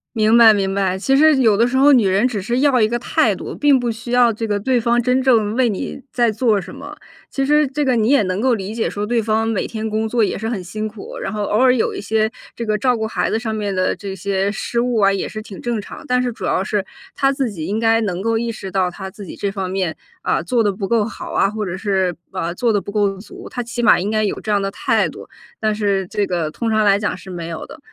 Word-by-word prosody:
明 220 +1 +4
白， 225 -2 +8
明 195 -2 -1
白， 190 -2 0
其 270 +6 +2
实 305 0 +5
有 225 -6 +4
的 230 - +3
时 245 +2 0
候， 280 +2 +6
女 235 -6 +4
人 195 +6 +3
只 220 -6 -3
是 240 +6 -1
要 265 -4 +3
一 215 - +4
个 240 +1 -1
态 - - +2
度， - - -7
并 285 -3 +4
不 245 -1 -1
需 230 +2 -6
要 245 -2 +4
这 225 +2 -4
个 205 -2 -1
对 255 +5 +1
方 235 +1 +2
真 250 +2 +2
正 225 -4 +3
为 255 -2 +3
你 205 +6 -4
在 240 -2 +2
做 220 -1 +1
什 185 - -9
么。 - - -9 0.4
其 275 - -1
实 300 +2 +4
这 285 +2 -2
个 255 -2 +2
你 220 0 +2
也 280 -2 +5
能 185 +1 -2
够 255 0 +3
理 205 0 -4
解 230 - -1
说 205 +1 -3
对 235 +1 +1
方 220 +1 +1
每 225 -3 -1
天 220 -1 -4
工 220 +1 -1
作 235 +1 +1
也 210 - +1
是 220 +2 -3
很 210 -6 -3
辛 215 +4 -5
苦， 335 - -8
然 - - -4
后 210 -1 -3
偶 205 - 0
尔 255 0 +5
有 245 - 0
一 - - -5
些 220 +1 +1 0.3
这 235 - -3
个 215 -1 0
照 250 +2 +1
顾 220 0 -2
孩 - - -1
子 220 - 0
上 220 -1 -3
面 205 -2 -2
的 185 0 0
这 200 -2 -6
些 195 +1 -1
失 235 +3 -2
误 245 -1 0
啊， 200 -2 +4
也 195 - -2
是 215 - -6
挺 205 -3 -10
正 240 -2 -2
常， 205 - -9
但 250 0 +1
是 250 - 0
主 - - -10
要 185 - +1
是 200 0 -1 0.3
他 275 -1 +2
自 270 -3 -1
己 165 -6 -6
应 210 +5 -2
该 225 0 +3
能 185 -4 -2
够 225 +2 +1
意 235 0 -2
识 200 -3 -7
到 185 -1 0
他 190 +2 -7
自 205 +1 -10
己 - - -9
这 200 - -1
方 195 -2 -4
面， 185 -5 -1 0.3
啊， - - +1
做 230 +8 +1
得 205 -2 +1
不 195 0 -4
够 225 -3 +2
好 230 - -7
啊， 195 - +2
或 215 0 -4
者 180 -1 -4
是， 190 -3 0 0.2
啊， 185 -3 -3
把 170 - -3
做 230 +4 +1
的 205 - +1
不 - - -7
够 200 -2 0
足， 205 +2 -11
他 245 - -4
起 240 +1 -4
码 225 - +6
应 200 +4 -2
该 215 -1 +1
有 200 - -3
这 215 - -3
样 205 -1 +2
的 195 - -1
态 - - +1
度， - - -10 0.3
但 215 -1 +1
是 200 -3 0
这 205 +1 -1
个 170 -4 -2
通 230 +7 -3
常 215 -1 +2
来 200 -1 +4
讲 210 - -1
是 190 - -12
没 170 -2 -6
有 165 -1 -6
的。 - - -12
215 Hz, 310 characters per minute, -19 LUFS, 200-240 Hz, 0.4 s, 白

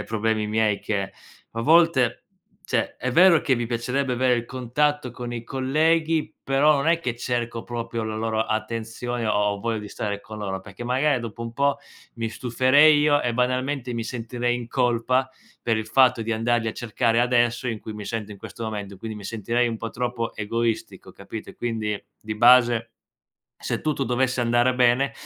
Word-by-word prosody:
eh, - - -5
problemi 110 -1 -1
miei 110 -2 +1
che, 100 -2 -2 0.4
a 115 - -4
volte, 160 -4 +3 0.4
cioè - - -1
è 130 0 -3
vero 175 -1 +6
che 135 - +2
mi 120 -1 -2
piacerebbe 125 +3 -1
avere 125 0 +3
il 120 0 -2
contatto 130 +2 -1
con 120 0 -6
i 120 -1 -5
colleghi, 155 +5 +1
però 140 +3 +4
non 140 +3 0
è 165 0 +4
che 120 -7 -3
cerco 120 -1 -3
proprio 115 -1 -4
la 110 0 -4
loro 110 0 0
attenzione 115 +2 -3
o 105 - +1
ho 105 -1 +1
voglia 115 -1 -1
di 105 - -7
stare 100 0 -4
con 110 +1 -10
loro, 95 -2 -4
perché, 100 +4 -10
magari, 130 +2 +1
dopo 115 0 -7
un 115 - -5
po', 140 +3 +1 0.4
mi 115 -1 -3
stuferei 130 +6 +4
io 145 -1 +3
e, 120 - 0
banalmente, 125 +1 -1
mi 115 - -2
sentirei 120 +1 -2
in 120 -1 -6
colpa, 125 +1 +1 0.3
per 115 -2 +1
il 110 0 -3
fatto 130 -3 +4
di 115 +1 -2
andarli 115 +1 0
a 110 - -1
cercare 115 0 0
adesso 120 0 +2
in 115 -2 -3
cui 110 - -8
mi 105 -1 -7
sento 105 -2 -4
in - - -10
questo 115 - -8
momento, 105 -2 -5
e - - -13
quindi 110 +1 -7
mi 100 - -10
sentirei 115 +3 0
un 115 - -3
po' 115 +1 -5
troppo 120 -1 -3
egoistico, 110 -3 -3
capito? 105 +3 -8
E - - -16
quindi, 110 -3 -3 0.2
di 110 0 -5
base, 120 0 +5 0.7
se - - -2
tutto 150 -3 -1
dovesse 125 0 0
andare 120 +2 +2
bene, 125 +1 +3
120 Hz, 190 wpm, -24 LUFS, 110-130 Hz, 0.7 s, vero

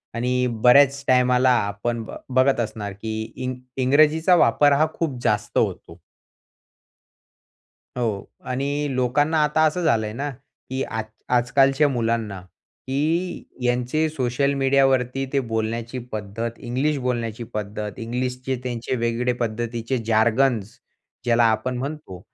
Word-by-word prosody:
आणि 125 +2 0 0.3
बऱ्याच 140 +2 +6
टाईमाला 125 0 +4 0.2
आपण 115 +3 -3 0.3
बघत 130 0 +3
असणार 105 -3 -3
की 110 -1 -3 0.2
इंग 130 0 -3 0.3
इंग्रजीचा 155 +6 +4
वापर 145 -1 +4
हा 160 - +4
खूप 150 -7 -2
जास्त 105 0 0
होतो. 85 - -1 2.0
हो. 110 -5 -1 0.2
आणि 140 +3 -2
लोकांना 145 +5 +2
आता 150 +2 +2
असं 175 +4 0
झालंय 110 -7 +1
ना, 140 +5 -3
की 135 0 -8
आज 110 -1 -3 0.3
आजकालच्या 135 +4 +3
मुलांना, 115 -6 -1 0.5
की 160 +7 -1 0.2
यांचे 125 +6 +1
सोशल 140 0 0
मीडियावरती 135 -1 +2
ते 140 - +2
बोलण्याची 115 +1 -3
पद्धत, 110 +2 -4
इंग्लिश 135 +5 -1
बोलण्याची 120 -2 -2
पद्धत, 105 +1 -4
इंग्लिशचे 125 +2 -3
त्यांचे 120 0 -3
वेगळे 120 +1 0
पद्धतीचे 115 +2 -2
जार्गन्स 115 0 +2 0.5
ज्याला 120 -1 +3
आपण 115 +3 -1
म्हणतो, 135 - -6
125 Hz, 115 wpm, -23 LUFS, 115-135 Hz, 2.0 s, बऱ्याच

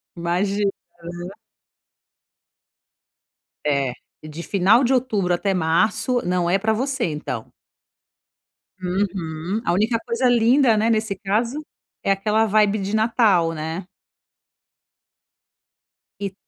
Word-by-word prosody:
Imagina. 195 +4 0 0.3
Aham. 175 +2 -7 2.3
É, 140 -4 +1 0.3
de 155 +2 -7
final 200 +6 +3
de 260 +2 +2
outubro 210 -8 +1
até 195 +2 0
março, 205 +9 +1
não 180 -1 0
é 190 - +3
para 220 +2 +1
você, 260 +2 -1
então. 150 -8 -5 1.3
Uhum. 180 0 -2
A - - +2
única 220 +5 +2
coisa 240 +1 +1
linda, 240 +1 +4
né, 220 +2 +2
nesse 220 -3 0
caso, 230 +10 -1 0.4
é 195 - +2
aquela 210 +3 +2
vibe 210 0 +2
de 200 +2 -2
Natal, 215 -7 +3
né. 160 +3 -5 2.3
E 200 -1 -4
200 Hz, 105 wpm, -22 LUFS, 175-225 Hz, 2.3 s, linda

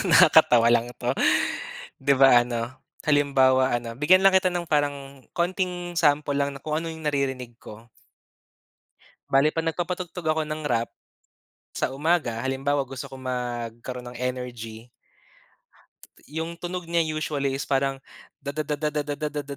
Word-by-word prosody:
...nakakatawa 115 -1 +6
lang 120 0 +2
'to. 125 +1 0 0.9
'Di 140 +1 +3
ba 130 -3 +7
ano 120 +1 -4 0.3
halimbawa 135 -3 +3
ano 115 -1 -7
bigyan 170 +7 +5
lang 195 0 +5
kita 185 -1 +4
ng 175 -1 -3
parang 140 -2 -1
konting 175 0 -2
sample 145 -2 +2
lang 140 0 +1
na 140 - -8
kung 155 -1 -3
ano 165 +1 -3
yung 160 -1 -8
naririnig 130 -4 -2
ko. 110 0 -12 1.4
Bale 140 +3 +3
pag 165 0 -2
nagpapatugtog 175 +1 -4
ako 155 0 +2
ng 155 0 -4
rap 115 -3 0 0.8
sa - - -1
umaga, 145 -6 0
halimbawa 135 +1 0
gusto 130 -1 -7
ko 135 - -10
magkaroon 125 -1 -5
ng 120 - -10
energy. 120 -2 -5 1.4
'Yung 160 +3 -4
tunog 180 -1 -5
niya 170 0 +2
usually 150 -3 -2
is 140 - -4
parang 135 0 0 0.4
da 140 - -4
da 155 - -1
da 150 - -2
da 150 - 0
da 150 0 -1
da 145 0 -4
da 150 0 -2
da 145 -1 -4
140 Hz, 155 wpm, -25 LUFS, 125-155 Hz, 1.4 s, ba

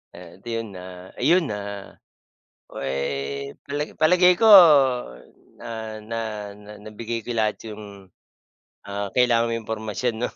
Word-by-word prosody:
At 90 +2 -14
ayun, 115 -3 -5
ah, 90 0 -10
ayun, 165 +6 +3
ah, 100 -1 -8 0.7
puwe 70 0 -4 0.6
pala 145 +1 -3
palagay 180 +3 +5
ko 225 +4 +3 1.1
na 110 -1 -7
na 115 +1 -4 0.3
na 105 +1 -14
nabigay 115 +1 -6
ko - - -6
lahat 110 -2 0
'yong, 100 -4 -11 0.8
ah, 100 0 -4
kailangan 120 -2 +3
mo - - -1
impormasyon 110 +1 -3
'no. - - +1
110 Hz, 120 wpm, -23 LUFS, 100-120 Hz, 1.1 s, palagay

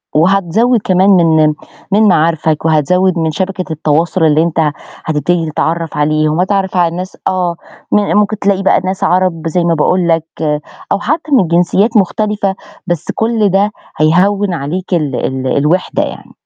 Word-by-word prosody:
وهتزوِّد 195 +8 +2
كمان 185 +1 +2
من 160 -5 +4 0.4
من 210 +3 +3
معارفك 160 -2 +1
وهتزوِّد 180 +4 +2
من 160 -1 0
شبكة 185 +3 -3
التواصل 160 +3 0
اللي 155 0 +3
أنت 160 -2 0 0.3
هتبتدي 160 +1 -1
تتعرف 165 0 -2
عليهم، 155 +1 +1
وهتتعرف 190 0 0
على 175 - +3
الناس 180 +2 -6
آه 180 -2 -1 0.4
م - - +4 0.2
ممكن 210 0 +1
تلاقي 195 -1 0
بقى 190 - +3
ناس 190 0 -3
عرب 175 -3 0
زي 170 +2 0
ما 170 - +1
باقول 175 +3 +1
لك 165 -1 +1 0.7
أو 200 - +1
حتى 305 +6 -2
من 235 -11 +3
جنسيات 185 +6 +2
مختلفة 205 0 0 0.3
بس 175 -3 -2
كُل 220 -2 +1
ده 200 +3 +1 0.3
هيهوِّن 185 +5 +2
عليك 175 +5 -4
ال 150 -6 0
ال 130 0 -3
الوِحدة 155 +6 0
يعني. - - -8
175 Hz, 155 wpm, -13 LUFS, 160-195 Hz, 0.7 s, من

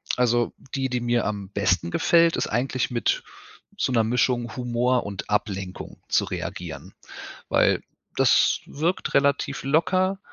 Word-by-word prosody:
Also, 120 -1 +1 0.2
die, 135 -1 -1
die 125 -1 -1
mir 120 0 +1
am 100 -2 -4
besten 95 -4 0
gefällt, 170 -1 +3
ist - - -1
eigentlich 125 +2 -1
mit 125 - 0 0.5
so 130 - 0
'ner 115 -2 +3
Mischung 120 0 0
Humor 125 0 0
und 100 -3 -6
Ablenkung 100 -3 -3
zu - - +2
reagieren. - - -6 0.6
Weil - - +3 0.3
das - - +4
wirkt 165 +5 -2
relativ 140 -1 +1
locker 185 +7 +1
125 Hz, 135 wpm, -24 LUFS, 110-140 Hz, 0.6 s, das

